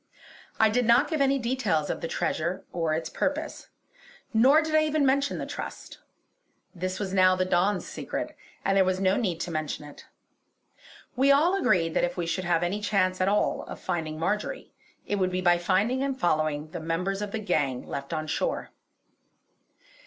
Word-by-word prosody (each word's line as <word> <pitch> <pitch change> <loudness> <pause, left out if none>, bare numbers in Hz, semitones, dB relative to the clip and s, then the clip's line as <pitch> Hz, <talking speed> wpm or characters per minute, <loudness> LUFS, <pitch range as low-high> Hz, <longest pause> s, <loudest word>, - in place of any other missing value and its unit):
I 220 - +6
did 245 +3 +1
not 235 +4 +5
give 310 -3 0
any 275 0 +3
details 235 - 0
of - - -5
the 165 - -2
treasure 170 +3 -2
or 165 -3 0
its 160 0 -3
purpose; 290 - -3 0.7
nor 260 +7 +6
did 315 0 -4
I 310 0 +5
even 305 -1 +1
mention 280 +1 +1
the - - -4
trust. - - -7 0.7
This 185 0 -4
was 195 -2 -3
now 185 -1 +5
the 185 0 0
Don's 185 +2 +1
secret, - - -5 0.3
and 195 - +2
there 195 - +5
was 185 0 0
no 190 0 +3
need 185 -8 -1
to 175 - -3
mention 155 -1 -3
it. 145 - -13 1.1
We 270 +3 +4
all 320 +7 +4
agreed 170 - +2
that - - +1
if 175 - -1
we 175 - -1
should 165 +2 -2
have 175 -1 +2
any 195 +4 -1
chance 185 -3 +1
at 185 - +2
all 210 - +1
of - - -8
finding 165 -4 -3
Marjory, 210 - -2 0.3
it 205 - -1
would 185 -1 +1
be 185 0 -2
by 175 -1 +3
finding 210 +9 +1
and 270 -1 -2
following 155 -2 0
the 175 - -5
members 180 +5 -2
of 205 -1 -4
the 225 - -2
gang 145 - -1
left 140 +2 -6
on 155 -1 -2
shore. 155 - -2
185 Hz, 190 wpm, -27 LUFS, 165-235 Hz, 1.1 s, I